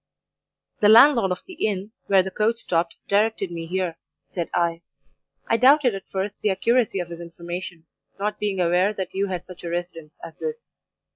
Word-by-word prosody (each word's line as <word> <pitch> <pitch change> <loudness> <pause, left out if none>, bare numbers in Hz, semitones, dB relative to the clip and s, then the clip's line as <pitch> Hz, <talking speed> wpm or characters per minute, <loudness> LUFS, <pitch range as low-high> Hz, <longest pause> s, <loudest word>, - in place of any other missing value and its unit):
"'The 210 - +5
landlord 230 -3 +7
of 180 - -3
the 370 - -10
inn, 200 0 -3 0.2
where 195 -2 +5
the 190 - -5
coach 220 +4 +1
stopped, 170 -6 -1
directed 205 -2 +1
me 165 -1 -5
here,' 180 -2 -2 0.3
said 170 -3 -4
I. 170 -1 0 0.7
'I 230 - +3
doubted 260 0 +5
at 195 -1 -8
first 195 +1 -4
the 210 - +1
accuracy 230 +1 +1
of 175 -1 -4
his 170 0 -8
information, 170 0 -7 0.3
not 210 +1 -2
being 205 -2 -1
aware 180 +4 +2
that 190 -2 -5
you 195 +1 0
had 180 -2 -4
such 180 -1 -12
a 170 - -4
residence 170 -3 -5
as 165 - -8
this. 470 0 -6
190 Hz, 185 wpm, -24 LUFS, 175-210 Hz, 0.7 s, landlord